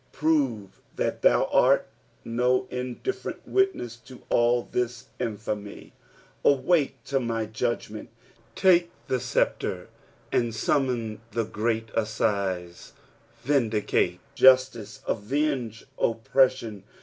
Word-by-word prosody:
Prove 135 -11 0 0.2
that - - -2
thou - - +4
art - - +4 0.4
no 125 +2 +1
in 125 -1 -4
different 390 - -4
witness 385 - 0
to 125 +1 -15
all 120 0 +3
this 125 +1 -2
infamy. 105 -1 -5 0.3
" - - -31
Auak« 140 +1 +3
to 135 -1 0
my 115 -3 -2
judgment." 110 -1 -3 0.5
Take 175 -2 +4 0.2
the 130 - 0
sceptre - - -1 0.4
and 120 -2 0
summon 120 -5 0
the 115 -1 0
great 110 +1 -2
assize; 100 -5 -2 0.5
vindicate 120 -6 +1
justice, 130 -4 +4
aveoge 125 0 -1 0.2
oppression. 115 -2 +1
120 Hz, 100 wpm, -26 LUFS, 110-130 Hz, 0.5 s, thou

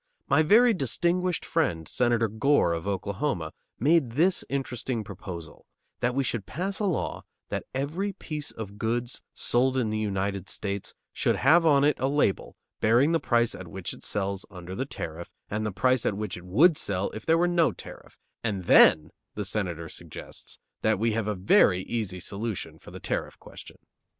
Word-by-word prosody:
My - - +4
very 225 +9 +6
distinguished 175 - 0
friend, 85 - 0
Senator 120 -2 +2
Gore, 110 -3 +2
of 85 +3 -4
Oklahoma, 100 - -2 0.3
made 140 -2 +3
this 175 +7 +3
interesting 130 -3 -2
proposal: 90 -4 -9 0.3
that 125 +1 0
we 135 - +2
should 120 -5 -3
pass 190 +5 -2
a 210 - 0
law 185 -5 -2 0.3
that - - -3
every 160 +10 -2
piece 150 -4 -5
of 105 -2 -8
goods 120 +2 -2
sold 130 +2 +1
in 115 -4 0
the 110 - -1
United 100 -2 -2
States 100 -1 -4 0.2
should - - +1
have 165 0 +5
on 140 -2 +5
it 145 -1 +2
a 130 - +1
label 140 -8 0 0.2
bearing 120 +8 +4
the 165 - +2
price 120 -4 +2
at 90 - -8
which 95 +1 -5
it - - -13
sells 100 -1 -1
under 90 -2 -9
the 130 +7 -3
tariff 85 - -6 0.2
and 110 +1 -1
the - - -2
price 125 +6 +2
at 100 - 0
which 105 -2 -4
it 90 - -10
would 145 - +5
sell 100 -7 -1
if 110 - -8
there 165 0 +3
were 175 +1 +3
no 175 -2 +3
tariff, - - -12 0.3
and 100 -5 -2
then 80 -2 +6 0.2
the 105 - -3
Senator 90 -5 -2
suggests - - -10 0.2
that 110 -1 +2
we 115 +3 +1
have 110 -1 -1
a 105 - -1
very 95 0 +4
easy 100 -6 -3
solution 105 +3 -5
for - - -13
the - - -9
tariff - - -3
question. - - -12
115 Hz, 180 wpm, -27 LUFS, 100-145 Hz, 0.3 s, very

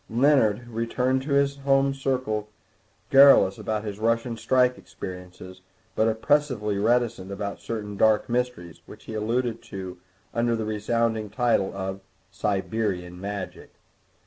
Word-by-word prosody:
Leonard 120 -3 +3
returned 125 +3 0
to 140 +1 -3
his 140 0 +2
home 135 0 +2
circle 130 -6 -2 0.6
garrulous 135 -8 +7
about 110 -1 -2
his 105 -1 -6
Russian 115 +1 0
strike 125 +3 +2
experiences, 90 0 -10 0.3
but 110 - +3
oppressively 110 -3 +1
reticent 115 -3 +1
about 100 0 -4
certain 105 -3 -5
dark 110 +1 +3
mysteries, 120 -9 -3
which - - -13
he - - -8
alluded 115 +2 -1
to 95 -3 -8 0.3
under 115 0 +1
the 110 -1 -3
resounding 110 +1 -1
title 115 -5 +1
of 95 0 -4 0.3
Siberian 95 -3 -2
Magic. 100 -1 -6
110 Hz, 125 wpm, -25 LUFS, 100-125 Hz, 0.6 s, garrulous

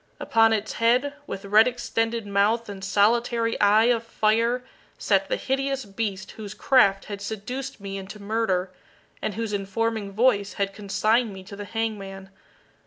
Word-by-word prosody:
Upon 225 0 +4
its 220 -1 -1
head, 250 +5 +2
with 195 - -6
red 215 +4 +6
extended 230 -2 -1
mouth 205 +4 +1
and 195 -2 -8
solitary 230 +3 +2
eye 210 +2 +5
of 235 -1 +2
fire, 230 +2 +1 0.3
sat - - +1
the - - +1
hideous 270 - -2
beast 200 -2 -4
whose 210 -1 -8
craft 200 -5 +3
had 200 -1 -7
seduced 225 +6 -5
me 195 0 -5
into 195 +2 -9
murder, 200 -3 -1 0.5
and 210 - -3
whose 225 -1 -3
informing 205 +1 -2
voice 205 -2 +2
had 200 -1 -2
consigned 215 +3 +1
me 190 -1 -9
to 200 +2 -10
the 205 0 -7
hangman. 200 -3 -4
215 Hz, 155 wpm, -25 LUFS, 200-230 Hz, 0.5 s, red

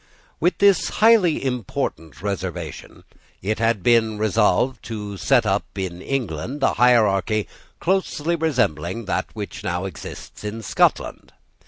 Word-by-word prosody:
With 175 - +1
this 200 -2 +4
highly 210 -10 +4
important 85 - -3
reservation, 90 -5 -5 0.4
it 105 +2 -1
had 115 -4 +1
been 115 -1 +3
resolved 110 +3 +2
to 105 -3 -5
set 125 +2 +3
up 100 0 +1
in 90 -2 -4
England 130 - -3
a - - +3
hierarchy 110 -4 +3 0.3
closely 170 -3 0
resembling 115 - -1
that 95 - -1
which - - -7
now 90 +2 -2
exists 95 +2 -9
in 110 +2 -5
Scotland. - - 0
110 Hz, 125 wpm, -22 LUFS, 95-130 Hz, 0.4 s, this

